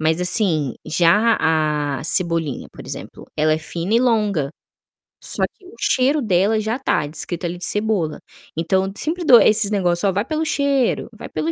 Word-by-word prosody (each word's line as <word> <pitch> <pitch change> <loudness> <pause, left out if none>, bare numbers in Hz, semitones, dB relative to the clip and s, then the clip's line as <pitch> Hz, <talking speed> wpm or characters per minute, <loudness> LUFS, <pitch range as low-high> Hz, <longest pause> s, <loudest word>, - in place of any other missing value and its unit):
Mas, 160 +2 +1
assim, 180 - +2
já 200 +8 +3
a 150 -3 0
cebolinha, 165 -4 -1
por - - -12
exemplo, - - -8
ela 155 0 +2
é 155 - +1
fina 170 +6 -4
e - - +5
longa, 210 - +1 0.7
só - - +3
que 385 - -23
o 380 +5 -14
cheiro 275 +3 +2
dela 205 +1 +2
já 220 +3 -2
tá 205 - 0
descrito 170 +3 -5
ali 175 +1 -4
cebola. 205 -6 -1 0.4
Então 190 +4 +1
eu 195 - -5
sempre 340 +7 -3
dou 245 -6 +8
esses 215 -1 +3
negócio: 180 -2 +1
"Ó, - - +1
vai 200 +4 -1
pelo 310 +3 -2
cheiro, 280 -4 0
vai 215 - -9
pelo 155 +1 -2
190 Hz, 175 wpm, -20 LUFS, 160-225 Hz, 0.7 s, dou